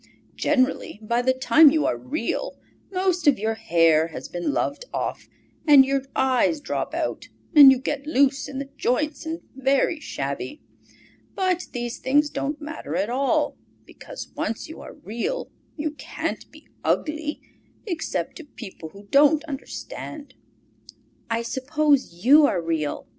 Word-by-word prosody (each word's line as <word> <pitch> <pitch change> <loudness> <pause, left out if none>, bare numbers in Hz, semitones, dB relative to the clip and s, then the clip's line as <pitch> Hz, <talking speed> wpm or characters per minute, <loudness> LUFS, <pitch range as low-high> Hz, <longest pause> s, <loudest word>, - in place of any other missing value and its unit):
Generally, 255 -6 0
by 235 +3 +1
the 260 +1 +3
time 285 +4 +6
you 305 +1 +1
are - - +1
Real, 175 - -3 0.3
most 370 -3 0
of 285 - +6
your 220 +2 -1
hair 165 -7 +3
has 165 - -8
been 175 +10 -2
loved 285 +10 -2
off, - - -4 0.4
and 280 -3 +8
your 275 0 0
eyes 265 +4 +2
drop 290 - -3
out - - -3 0.3
and 285 -3 +11
you 265 - +3
get 275 +2 -4
loose 280 -1 +2
in 275 - -7
the 275 0 -4
joints 300 +5 -1
and 325 +1 -4
very 270 +4 +1
shabby. 140 - -5 0.8
But 370 -2 0
these 240 -1 -4
things 295 +3 +2
don't 290 +2 -3
matter 300 - -6
at 195 +6 0
all, 270 +2 +1 0.3
because - - -10
once 220 - -3
you 320 - -10
are - - -10
Real 300 - -4 0.3
you 305 0 -2
can't 290 -3 -5
be - - -17 0.2
ugly, 310 -1 -1 0.5
except 345 -6 -3
to 330 - -9
people 195 - -10
who 200 +4 -14
don't 295 +2 +5
understand." 295 - -7 1.0
"I 230 0 0
suppose 265 - 0
you 290 +3 +8
are 180 - 0
real?" 160 -3 -2
275 Hz, 145 wpm, -24 LUFS, 230-305 Hz, 1.0 s, and